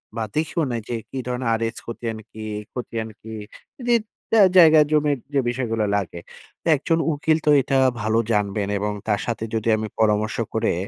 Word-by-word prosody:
বা 115 - -1
দেখিও 160 +2 0
নাই 115 -1 -2
যে 120 - -1
কী - - -7
ধরনের 125 -1 -2
আর 115 - -1
এস 115 - -7
খতিয়ান 115 -1 -5
কি? 110 0 -8 0.3
খতিয়ান 115 -3 -4
কি? 110 0 -9 0.5
দিত 235 -2 +3 0.3
অ্যা 215 - +8
জায়গা-জমির 150 -3 +5
যে 140 - +3
বিষয়গুলো 115 -3 -1
লাগে। 90 -4 -3 0.4
তা - - -6
একজন 165 +4 0
উকিল 155 +1 +1
তো - - +3
এটা 135 +1 0 0.2
ভালো 110 +1 +2
জানবেন। 105 -1 0
এবং 105 +1 -1 0.2
তার 105 -2 +1
সাথে 115 -2 -3
যদি 110 0 -2
আমি 110 0 -3
পরামর্শ 105 0 +2 0.2
করে, 110 - +1
115 Hz, 175 wpm, -23 LUFS, 110-145 Hz, 0.5 s, অ্যা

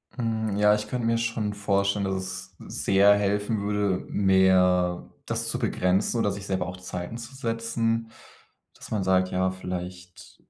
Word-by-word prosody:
Hm, 110 -4 -1
ja, 105 0 +5
ich 105 0 -1
könnte 120 +1 -3
mir 115 0 +2
schon 115 -2 -1
vorstellen, 100 0 0
dass 95 0 -1
es 95 0 -5 0.3
sehr 100 +1 +6
helfen 105 +1 0
würde, 100 -2 0
mehr 95 -2 +3 0.2
das - - -2
zu - - -2
begrenzen 95 +6 +1
oder 105 -3 +1
sich 100 0 -6
selber 95 -2 -1
auch 90 0 -6
Zeiten 90 +3 -6
zu 120 +3 -9
setzen, 115 -2 -1 0.6
dass - - -12
man 105 -3 0
sagt, 95 0 +2
ja, 95 0 +1
vielleicht 90 -1 -7
100 Hz, 160 wpm, -26 LUFS, 95-110 Hz, 0.6 s, sehr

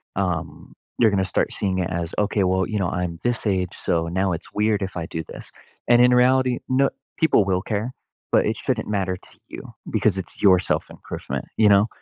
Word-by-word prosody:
um 90 -5 -3 0.3
you're 115 - +6
gonna 100 -2 +1
start 90 - 0
seeing 95 -2 -1
it 90 - -1
as, 85 -2 -3
okay, 105 -1 +1
"Well, 95 0 +1
you 110 - -2
know, 95 -4 0
I'm 90 -2 -3
this 120 -2 0
age, 95 -3 0
so 85 -1 -1
now 95 +3 0
it's 80 - -7
weird 105 -1 +1
if 95 - -5
I 85 -2 -4
do 80 - -4
this," - - -10 0.4
and 120 0 +6
in 125 0 +6
reality, 125 0 +3
no 135 +1 +3 0.3
people 160 -9 +4
will 95 -1 0
care, 110 +3 -3 0.4
but - - +4
it 110 - 0
shouldn't 120 -4 -2
matter 95 -3 -1
to - - -18
you, - - -10 0.2
because 95 -3 +2
it's 90 - -8
your 95 -3 +6
self 95 - -2
improvement. - - -6
You 105 -2 +5
know? 100 +1 +5
100 Hz, 210 wpm, -23 LUFS, 90-110 Hz, 0.4 s, you're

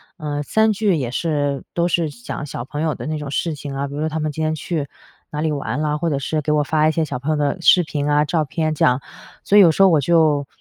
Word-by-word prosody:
呃， 150 -4 -4
3 220 +8 +2
句 210 -3 +1
也 130 -6 -2
是 145 -2 -1
都 170 0 +1
是 170 -3 +1
讲 140 +2 -7
小 125 -4 -6
朋 145 +4 -5
友 160 -2 0
的 - - -7
那 155 0 -2
种 150 -2 -6
事 160 +3 -1
情 145 -1 -7
啊， 140 +1 -2
比 140 - -8
如 - - -4
说 155 - 0
她 160 0 -3
们 155 -1 -1
今 160 - -5
天 155 0 0
去 155 -2 -3 0.4
哪 150 - -3
里 155 0 0
玩 145 0 -3
了， 150 0 0
或 165 +2 -1
者 145 - 0
是 155 +3 -2
给 150 +1 0
我 150 -1 +2
发 155 +1 +2
一 - - +3
些 165 - 0
小 130 -5 -4
朋 145 +4 -2
友 - - +1
的 145 +2 0
视 180 +1 +5
频 150 -2 -3
啊、 150 0 +3
照 155 +1 0
片， 155 +2 -1
这 155 - +2
样。 125 +2 +2 0.4
所 205 - +3
以 - - +10
有 180 - +7
时 195 - +4
候 195 - +7
我 160 -4 +4
就 150 -2 +2
150 Hz, 305 characters per minute, -20 LUFS, 145-160 Hz, 0.4 s, 以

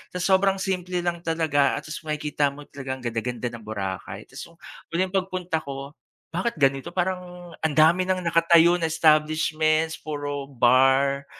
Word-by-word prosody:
Tapos 180 - -2
sobrang 190 +1 +4
simple 185 -2 -2
lang 175 -1 -1
talaga, 160 -4 +1
ah, - - -5
tas 155 - -7
makikita 150 -1 0
mo 145 - -10
talagang 130 -2 -7
ganda-ganda 120 +1 -3
ng 120 -2 -10
Boracay, 95 -3 -5
tas - - -13
yung, 170 - -20 0.4
huling 185 +1 0
pagpunta 185 -3 -1
ko, 140 -2 -7 0.4
bakit 185 +7 -2
ganito? 135 +4 +1
Parang, 180 -1 -3
ang 160 -2 -1
dami 165 +5 +4
ng 185 0 0
nakatayo 170 0 +4
na 170 - -1
establishments, 155 0 +2
puro 145 -2 -5
bar, 135 +2 +3
155 Hz, 155 wpm, -24 LUFS, 140-175 Hz, 0.4 s, sobrang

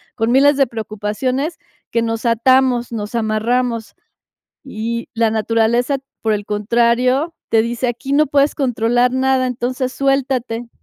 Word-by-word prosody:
con 225 0 0
miles 280 +3 +5
de 275 -2 +3
preocupaciones, 230 - -3 0.3
que 230 - 0
nos 225 0 -3
atamos, 245 +1 +3
nos 210 -1 -5
amarramos. 230 +1 -1 0.7
Y 235 -2 -4
la 225 -1 +1
naturaleza, 230 +4 +1 0.2
por 220 -1 +1
el 205 -1 -3
contrario, 240 +8 +1 0.2
te 225 -1 +4
dice: 240 +2 -2
"Aquí 245 +3 -3
no 300 +2 +4
puedes 285 0 +2
controlar 245 -1 +1
nada, 260 0 +1
entonces 250 +1 -2
suéltate". 260 -4 -1
240 Hz, 135 wpm, -18 LUFS, 225-260 Hz, 0.7 s, miles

